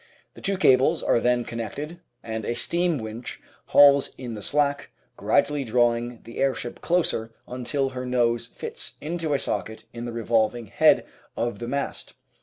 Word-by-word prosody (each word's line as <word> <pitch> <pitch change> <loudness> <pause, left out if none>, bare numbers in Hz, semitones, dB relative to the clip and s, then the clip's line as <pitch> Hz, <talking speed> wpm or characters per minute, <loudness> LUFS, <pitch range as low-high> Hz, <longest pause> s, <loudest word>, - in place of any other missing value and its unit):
The - - -13
two 195 0 0
cables 135 -1 +4
are - - +3
then 120 0 +1
con 115 - -6
nected, 150 +9 -5 0.2
and 110 -1 -4
a 120 - -2
steam 170 +2 +1
winch 110 +1 -6 0.3
hauls 140 -1 +6
in 125 -3 -6
the 105 - -7
slack, 145 +4 0 0.3
gradually 145 -1 +1
drawing 120 0 +1
the 115 - -9
airship 135 -2 -1
closer 115 -10 0
until 135 +2 -2
her 130 -1 -5
nose 120 -2 +1
fits - - -6
into 160 -1 -2
a - - +3
socket 110 -4 -3
in 120 0 -6
the 120 - -4
revolving 115 0 0
head - - +4 0.3
of 120 0 -2
the 120 - -5
mast. 140 +3 -4
125 Hz, 165 wpm, -25 LUFS, 115-145 Hz, 0.3 s, hauls